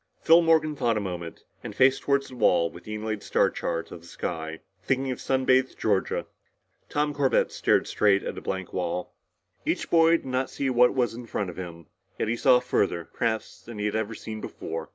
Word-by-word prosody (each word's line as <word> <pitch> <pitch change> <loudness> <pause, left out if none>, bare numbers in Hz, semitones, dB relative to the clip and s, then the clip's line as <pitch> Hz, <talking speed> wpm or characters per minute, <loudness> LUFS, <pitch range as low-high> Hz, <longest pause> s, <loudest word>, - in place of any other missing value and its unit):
Phil 165 +1 +6
Morgan 160 -2 +3
thought 115 -5 +1
a - - +1
moment, 90 -4 -6 0.2
and - - -7
faced 135 +1 +4
toward 140 -1 +2
the 130 - -11
wall 85 -8 +3
with 85 - -13
the 110 - -5
inlaid 110 -1 -3
star - - +2
chart 85 0 -3
of 85 - -9
the 85 - -15
sky, 80 -2 -5 0.2
thinking 135 +5 0
of 125 - -5
sun 130 -1 0
bathed 130 0 +3
Georgia. 100 -3 0 0.6
Tom 150 0 0
Corbett 140 -2 +2
stared - - +2
straight 100 -2 +2
at - - -4
a - - -7
blank 95 -2 -4
wall. 90 -1 -3 0.5
Each - - -2
boy 165 0 +6
did - - -15
not 130 0 -1
see 135 -2 -2
what 125 +1 +4
was 125 -3 +1
in 120 +1 -9
front 100 -4 -3
of - - -15
him 85 -2 -8 0.3
yet - - -1
he 115 - 0
saw 125 +1 +5
further, 95 -8 -1
perhaps, 110 -2 -2
than 115 -2 -10
he 105 - -2
had 105 - -1
ever 110 0 -2
seen 110 0 -7
before. 80 -5 -6
110 Hz, 215 wpm, -26 LUFS, 95-130 Hz, 0.6 s, Phil